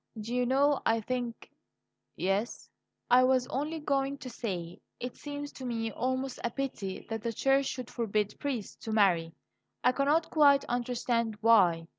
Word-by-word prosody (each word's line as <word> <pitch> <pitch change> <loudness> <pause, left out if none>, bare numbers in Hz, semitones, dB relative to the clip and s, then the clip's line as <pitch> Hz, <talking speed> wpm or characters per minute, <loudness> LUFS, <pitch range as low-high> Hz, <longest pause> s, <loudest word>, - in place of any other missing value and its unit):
Do 220 +3 -5
you 250 0 +1
know, 280 +2 +3
I 225 0 +2
think 240 +1 -4 0.3
" - - -55 0.3
"Yes?" 195 +5 -1 0.4
"I 250 +1 +7
was 255 -1 +3
only 300 +4 -2
going 275 -2 0
to 255 -2 -8
say 180 -8 -5 0.2
it 250 0 -5
seems 290 0 -6
to 265 - -10
me 225 -2 -2
almost 260 +3 -2
a 235 - +1
pity 235 -7 -4
that 225 -1 -4
the 230 - -2
Church 270 +4 +2
should 255 -2 -5
forbid 215 -3 -1
priests 260 -8 -3
to 220 - -3
marry. 175 -6 +2 0.5
I 250 - +5
cannot 290 +5 +1
quite 285 -2 +5
understand 240 -2 -1
why. 185 -8 +5
245 Hz, 165 wpm, -30 LUFS, 220-270 Hz, 0.5 s, I